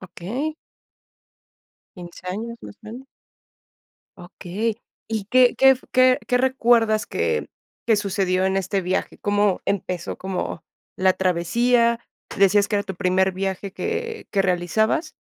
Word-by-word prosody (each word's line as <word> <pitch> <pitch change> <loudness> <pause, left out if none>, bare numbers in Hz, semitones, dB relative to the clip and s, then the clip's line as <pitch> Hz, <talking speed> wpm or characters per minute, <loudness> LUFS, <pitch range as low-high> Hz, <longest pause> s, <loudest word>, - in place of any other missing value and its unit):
Okey. 220 - -5 1.4
15 175 +1 -11
años 230 +5 -5
más 210 - -10
grande. 235 +5 -9 1.1
Okey, 200 +6 -4 0.3
¿y 220 -3 -2
qué 255 -1 +5
qué 265 -1 +6 0.2
qué 255 0 +5 0.2
recuerdas 235 -4 +2
que 465 0 -1 0.4
qué 225 -2 +4
sucedió 190 -2 0
en 190 0 +1
este 195 +1 -1
viaje? 185 +2 -2
¿Cómo 205 -1 +1
empezó 180 -3 -3
como 185 -3 -4 0.3
la 185 0 +3
travesía? 235 +7 +2 0.4
¿Decías 200 +1 +4
que 210 - 0
era 200 - 0
tu 190 -1 -7
primer 190 0 +2
viaje 195 +1 -4
que 450 - -4
que 195 -2 +2
realizabas? 215 - 0
205 Hz, 120 wpm, -22 LUFS, 185-235 Hz, 1.4 s, qué